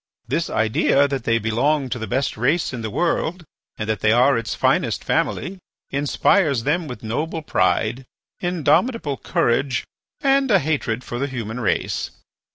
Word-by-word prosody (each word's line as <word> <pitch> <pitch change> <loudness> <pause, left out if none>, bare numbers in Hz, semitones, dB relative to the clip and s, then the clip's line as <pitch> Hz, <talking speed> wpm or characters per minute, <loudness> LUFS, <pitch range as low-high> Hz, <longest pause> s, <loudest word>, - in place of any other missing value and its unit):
"This 155 +7 -1
idea 110 +6 +2
that 135 -4 -3
they 115 0 +3
belong 130 +6 +1
to 120 0 -3
the 110 - -4
best 135 +7 -1
race 135 +7 +1
in 120 - -4
the 110 - -3
world, 170 - -1 0.3
and 110 - -4
that 110 -2 -1
they 110 - +3
are 125 +4 +5
its 115 -1 -2
finest - - +1
family, 190 +1 -1 0.3
inspires 140 - +2
them 160 +4 0
with 125 -5 -8
noble 155 +9 -3
pride, 115 +2 0 0.3
indomitable 175 - +1
courage, 120 +2 0 0.3
and 275 -1 +2
a 205 - +6
hatred 135 -7 -1
for 120 - -5
the 140 - 0
human 120 -3 -5
race. 105 -7 -1
135 Hz, 160 wpm, -22 LUFS, 115-160 Hz, 0.3 s, a